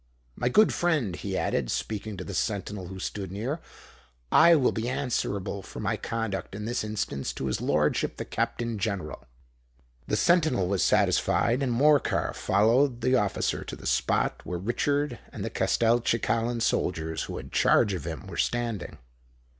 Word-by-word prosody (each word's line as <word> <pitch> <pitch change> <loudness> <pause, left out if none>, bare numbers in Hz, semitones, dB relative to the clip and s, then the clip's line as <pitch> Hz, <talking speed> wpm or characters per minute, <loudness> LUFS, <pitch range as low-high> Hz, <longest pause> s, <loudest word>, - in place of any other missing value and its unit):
My 120 - 0
good 215 +11 +5
friend," 150 - +1
he - - -4
added, 60 -4 0
speaking 105 -1 -3
to 90 - -5
the 100 - -7
sentinel 100 0 -2
who 95 +1 -8
stood 95 0 -5
near, 120 - -3 0.7
"I 170 +1 +7
will 135 -5 +3
be 115 +2 -2
answerable 100 -7 -2
for - - -10
my - - 0
conduct 115 -4 -4
in 105 +1 -5
this 120 0 -1
instance 105 -10 -3
to - - -5
his 65 - -1
lordship 75 0 +1
the - - -4
Captain 115 -3 -2
General." 100 - -3 0.8
The - - 0
sentinel 155 - +3
was 95 0 +1
satisfied; 120 +4 +2
and 130 -3 0
Morcar 145 +4 +3
followed 120 +5 +2
the 130 +2 +2
officer 105 -6 +1
to - - -7
the - - -13
spot - - +1
where 90 - -4
Richard 140 +7 -1
and - - -5
the - - -4
Castelcicalan 115 0 +1
soldiers 80 -7 -1
who - - -6
had - - -8
charge 105 -4 +3
of 90 -6 -4
him, 80 +3 -5
were 90 -4 -8
standing. 115 -9 -2
110 Hz, 160 wpm, -27 LUFS, 95-120 Hz, 0.8 s, I